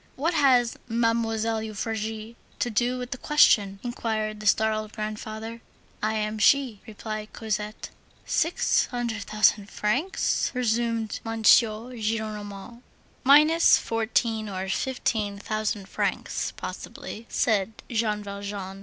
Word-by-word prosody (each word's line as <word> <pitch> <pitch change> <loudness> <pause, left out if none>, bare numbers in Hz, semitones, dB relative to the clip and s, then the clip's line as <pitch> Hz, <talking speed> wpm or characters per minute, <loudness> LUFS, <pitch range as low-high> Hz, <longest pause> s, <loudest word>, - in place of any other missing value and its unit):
"What 325 +6 0
has 255 -6 +4
Mademoiselle 225 -1 0
Euphrasie 220 +1 -4 0.2
to 240 - -1
do 240 +3 +1
with 250 0 -6
the 250 - -4
question?" 205 -10 +4
inquired 220 -3 -2
the 215 - -4
startled 215 +1 +2
grandfather. 220 +1 -5 0.4
"I 215 +1 0
am 215 0 -2
she," 250 -2 +3
replied 215 0 -6
Cosette. 215 -1 -4 0.3
"Six 330 +3 +2
hundred 235 -4 -3
thousand 215 -1 +2
francs?" 260 - 0
resumed 230 -2 0
M. 225 -1 -4
Gillenormand. 220 -1 +1 0.4
"Minus 305 +5 +6
fourteen 225 -1 -1
or 190 0 -4
fifteen 215 -4 -1
thousand 210 -1 -3
francs, - - -2
possibly," 230 +2 -7
said 215 -3 +1 0.2
Jean 215 -2 0
Valjean. 200 -1 -6
220 Hz, 110 wpm, -26 LUFS, 210-235 Hz, 0.4 s, Minus